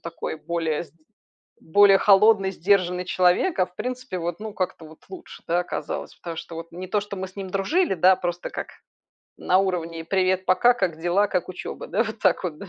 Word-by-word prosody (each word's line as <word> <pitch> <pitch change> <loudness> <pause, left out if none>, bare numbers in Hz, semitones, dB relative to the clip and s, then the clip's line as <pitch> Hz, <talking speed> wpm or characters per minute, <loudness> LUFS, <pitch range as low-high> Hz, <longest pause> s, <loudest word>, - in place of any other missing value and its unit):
такой 165 -1 -6
более 165 -1 -2
сд 155 - -23 0.7
более 195 +4 +5
холодный, 195 0 +5
сдержанный 180 -1 +1
человек, 185 - +2
а, 185 - +4
в 180 - -24
принципе 255 -5 -4
вот, 175 +3 -4
ну, 215 -1 -6
как-то 185 -3 -3
вот 155 0 -15
лучше, 365 -2 -11
да, 170 +1 +2
оказалось. 180 - -5
Потому 170 -1 -7
что 165 - -8
вот, 165 0 -8
не 185 +1 -7
то, 210 +2 +1
что 205 0 -7
мы 190 0 -4
с 190 +2 -19
ним 190 -1 -5
дружили, 250 - +1
да, 185 +1 +4
просто 175 -1 -4
как - - -5 0.7
на 185 - +2
уровне 170 -4 -2
"привет 185 +1 +1
пока, 240 +7 +4
как 180 -8 -2
дела, 175 +5 +1
как 180 -1 -1
учёба?" 185 - -7
Да, - - +1
вот 220 -1 -6
так 190 -2 +2
вот 160 -4 -4
да. 200 - -9
185 Hz, 205 wpm, -24 LUFS, 175-200 Hz, 0.7 s, более